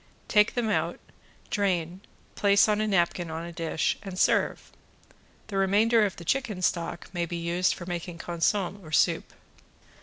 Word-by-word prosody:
Take 210 -1 +3
them 240 -2 0
out, 215 - 0 0.5
drain, 185 -3 -1 0.3
place 200 0 +4
on 210 0 +1
a 215 - 0
napkin 175 -3 +1
on 160 +1 -5
a 170 - -8
dish 165 -1 -1
and 195 -2 -7
serve. - - +1 0.7
The 200 - -5
remainder 210 +3 +4
of 195 - -8
the 170 - -10
chicken 220 -5 -1
stock 170 +1 -2
may 175 -1 -1
be 170 - -4
used 170 +2 0
for 175 - -8
making 175 -1 -5
consomme 175 +3 -1
or 155 - -11
soup. - - +2
185 Hz, 160 wpm, -27 LUFS, 170-205 Hz, 0.7 s, place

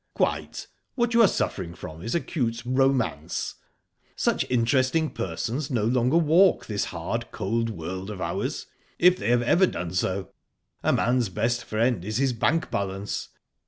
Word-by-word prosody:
"Quite. - - -1 0.3
What 240 -1 +1
you 230 - +6
are 220 - +8
suffering 85 - -2
from 80 -1 -9
is 115 - -3
acute 115 -9 -1
romance. 125 - 0 0.6
Such - - 0
interesting 130 +6 +2
persons 120 - -3
no 120 -6 0
longer 125 +6 +2
walk 170 +4 +4
this 105 -2 -1
hard, - - -4
cold 115 +4 -1
world 95 0 -5
of 105 -3 -6
ours, 85 -1 -3 0.3
if 180 +1 +6
they 105 - -1
have 120 0 +3
ever 180 +10 +4
done 85 - -4
so. 95 +1 -1 0.5
A - - +2
man's 120 -2 +2
best 115 +5 -1
friend 115 -3 0
is 110 +3 -2
his 135 -1 +2
bank 155 +8 0
balance. 100 0 -3
115 Hz, 155 wpm, -26 LUFS, 100-135 Hz, 0.6 s, are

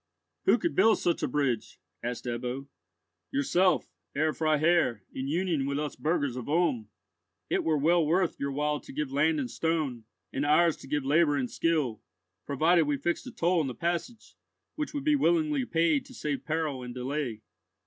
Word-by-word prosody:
"Who - - +5
could 340 - -1
build 225 0 +5
such 170 - 0
a - - +1
bridge?" 130 -5 -1 0.2
asked 120 +1 -4
Ebbo. 125 +3 -3 0.6
"Yourself, 175 +6 +2 0.3
Herr 155 +2 +1
Freiherr, 155 - +2
in 130 +1 -4
union 160 -3 0
with 140 0 -1
us 150 0 -3
burghers 150 -5 0
of 125 +1 -6
Ulm. 150 -10 +1 0.6
It - - +1
were 155 -2 +2
well 165 +4 +3
worth 170 +3 +1
your 140 0 -2
while 150 +1 0
to - - -12
give 150 -1 -3
land 155 +3 +2
and 125 -4 -3
stone, 140 -5 -1 0.3
and 135 - -1
ours 155 +3 +4
to - - -12
give 145 -1 -1
labour 150 +1 +3
and 130 -3 -2
skill, 150 -10 0 0.5
provided 160 +4 +3
we 145 -1 +1
fixed 175 - -2
a - - -6
toll 175 -5 +1
on 150 - 0
the 125 - -5
passage, 175 - -3 0.4
which 300 -2 -3
would 285 - -2
be 300 0 +3
willingly 300 -2 +2
paid 165 - +1
to - - -13
save 140 -3 -3
peril 155 -4 -1
and 125 0 -7
delay." 125 -3 -3
150 Hz, 180 wpm, -29 LUFS, 135-170 Hz, 0.6 s, Who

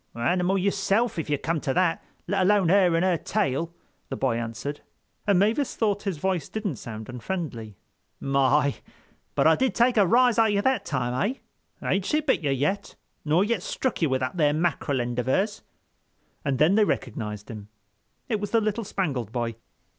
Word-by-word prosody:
"Animal 180 +10 +1
yourself, 200 +2 +1
if 155 - -4
you 145 - +2
come 160 +2 -2
to 135 - -1
that, 180 -2 +1 0.2
let 200 -1 +1
alone 190 -2 +3
her 185 -2 +4
and 170 +2 +2
her 180 -2 +2
tail," 165 -6 -1 0.4
the - - -3
boy 130 -4 +1
answered; 115 +5 -4 0.5
and 200 -3 +4
Mavis 220 +8 +1
thought 205 -3 0
his 195 -5 -3
voice 180 -2 -1
didn't 205 - -3
sound 110 -1 -8
unfriendly. 125 - -5 0.4
"My! 140 +1 +2 0.6
But - - +2
I 160 0 +6
did 260 +6 0
take 240 0 +3
a 200 -3 +5
rise 245 +2 +4
out 225 - +5
of 210 - +1
you 200 - +2
that 260 -7 +1
time, 130 - -1 0.5
eh? - - -4
Ain't 190 0 +1
she 305 - +2
bit 280 -8 +1
you 150 - -1
yet, 145 +9 -1 0.3
nor 160 +5 +3
yet 215 -2 0
strook 255 +4 -2
you 160 - +3
with 130 0 0
that 130 +7 -3
there 150 -3 +3
mackerel 155 -4 0
end 120 0 -3
of 125 - -2
hers?" 200 +10 0 0.8
And 140 -2 0
then 155 +7 +4
they 215 +1 +5
recognized 105 - -3
him. 105 -2 -9 0.6
It 220 -4 -1
was 205 -1 -3
the 230 - +3
little 215 +1 -1
Spangled 140 - -2
Boy. 120 -1 -2
170 Hz, 190 wpm, -26 LUFS, 130-205 Hz, 0.8 s, I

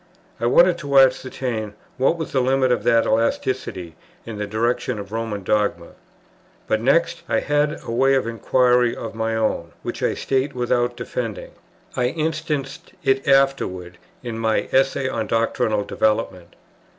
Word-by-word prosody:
I 120 - 0
wanted 170 +7 +5
to 140 -3 0
ascertain 125 -5 +1 0.2
what 135 +6 +2
was 160 - -5
the 130 - +2
limit 130 0 +2
of - - +1
that 115 0 +4
elasticity 110 -6 -1 0.3
in 110 -3 -7
the 105 - -3
direction 115 +3 -1
of 100 0 -8
Roman 110 -3 -3
dogma. 100 -4 0 0.8
But 110 - 0
next, 165 +7 +2
I - - +2
had 150 +1 0
a - - -6
way 135 +3 +3
of 130 - +1
inquiry 125 +1 +2
of 115 - -6
my 110 0 -2
own, 110 -7 -1
which - - -5
I - - 0
state 135 +1 -1
without 120 0 0
defending. 115 -4 -5 0.4
I 125 - +1
instanced 155 -2 -3
it 135 0 +1
afterwards 135 -11 +1 0.3
in 115 -2 -5
my 110 -1 0
Essay 135 0 +2
on - - -2
Doctrinal 115 -1 0
Development. 100 -5 -1
120 Hz, 150 wpm, -22 LUFS, 110-135 Hz, 0.8 s, wanted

